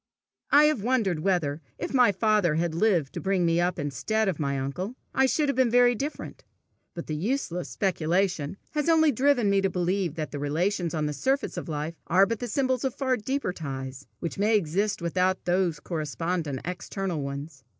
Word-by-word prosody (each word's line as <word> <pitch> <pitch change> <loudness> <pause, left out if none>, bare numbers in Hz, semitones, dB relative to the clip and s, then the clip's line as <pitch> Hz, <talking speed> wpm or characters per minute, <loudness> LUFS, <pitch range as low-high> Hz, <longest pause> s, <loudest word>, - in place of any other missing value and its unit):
I 290 +1 +7
have 300 -7 +3
wondered 215 -8 +1
whether, 160 -4 0 0.2
if - - -4
my 250 -5 +5
father 205 -5 +2
had 165 0 0
lived 170 -6 +1
to - - -5
bring 190 -2 +1
me 165 +1 +2
up 180 +1 0
instead 215 +10 -1
of 185 -6 -1
my 140 -2 -1
uncle, 180 - -4 0.2
I 265 0 +4
should 295 +3 +1
have 280 - 0
been 260 -2 +3
very 245 +1 +5
different; 280 +6 -5 0.5
but 170 - -5
the 155 - -4
useless 180 - -2
speculation 180 -2 0
has 300 +1 0
only 320 -2 +5
driven 255 -2 +2
me 200 0 +3
to 195 - +1
believe 180 -2 -1
that 155 -2 -4
the 145 - -5
relations 170 +4 -1
on 155 -1 0
the 150 - -2
surface 265 - -1
of - - -5
life 155 +2 -4
are 185 +3 +5
but 230 +1 -3
the 245 - -3
symbols 260 +1 0
of 265 -2 -1
far 260 -2 +1
deeper 255 -3 -2
ties, 135 -4 -6
which 170 +2 -5
may 215 +2 +4
exist 195 +2 -1
without 185 +2 0
those 175 -2 +1
correspondent 160 -2 -3
external 180 -1 -3
ones. 140 0 -6
185 Hz, 190 wpm, -27 LUFS, 160-225 Hz, 0.5 s, I